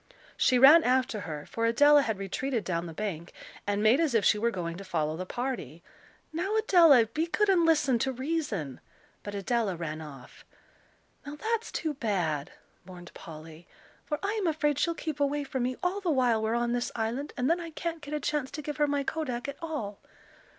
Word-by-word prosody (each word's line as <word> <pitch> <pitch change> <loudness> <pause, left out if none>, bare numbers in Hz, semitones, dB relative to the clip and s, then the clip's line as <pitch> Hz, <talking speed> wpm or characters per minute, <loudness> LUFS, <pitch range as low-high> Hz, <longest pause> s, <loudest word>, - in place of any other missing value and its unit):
She 255 - +3
ran 290 +6 +8
after 255 -3 +1
her, 155 -6 -6
for 230 0 -1
Adela 290 +5 +6
had 220 -6 -2
retreated 220 +5 -2
down 170 -1 -2
the - - -7
bank, 175 -3 -5 0.4
and 205 +1 0
made 220 +6 +5
as 310 -7 +1
if 215 - +3
she 210 - +4
were 235 +2 +2
going 170 -6 -4
to 195 - -8
follow 155 -4 -1
the 185 +2 -6
party. 225 - -4 0.5
"Now, 380 +6 -1
Adela, 335 - +6
be 310 +10 -2
good 415 +4 +1
and 345 -4 +4
listen 290 -6 +3
to 265 +2 0
reason." 260 - -3 0.4
But 205 0 -7
Adela 205 -1 0
ran 160 -2 -5
off. 140 -5 -12 0.8
"Now 290 +1 -7
that's 455 +7 -2
too 315 -2 -2
bad," 180 - -2 0.3
mourned 175 -1 -12
Polly, 160 +1 -11 0.4
"for 300 - -3
I'm 410 -1 -1
afraid 295 -3 +1
she'll 335 +1 +1
keep 310 -3 -5
away 285 +1 0
from 265 -2 -3
me 250 +1 -1
all 370 +3 0
the 365 - -1
while 250 -6 +2
we're 220 +1 0
on 240 0 0
this 245 0 -1
island, 240 +6 -2
and 250 0 0
then 335 +4 +2
I 335 - -6
can't 330 +1 -5
get 295 +1 -5
a - - -1
chance 295 -2 -2
to 300 - -7
give 295 0 -5
her 295 -1 +2
my 285 -1 0
kodak 275 -5 -3
at 280 - -6
all." 290 -12 -5
250 Hz, 200 wpm, -28 LUFS, 200-300 Hz, 0.8 s, ran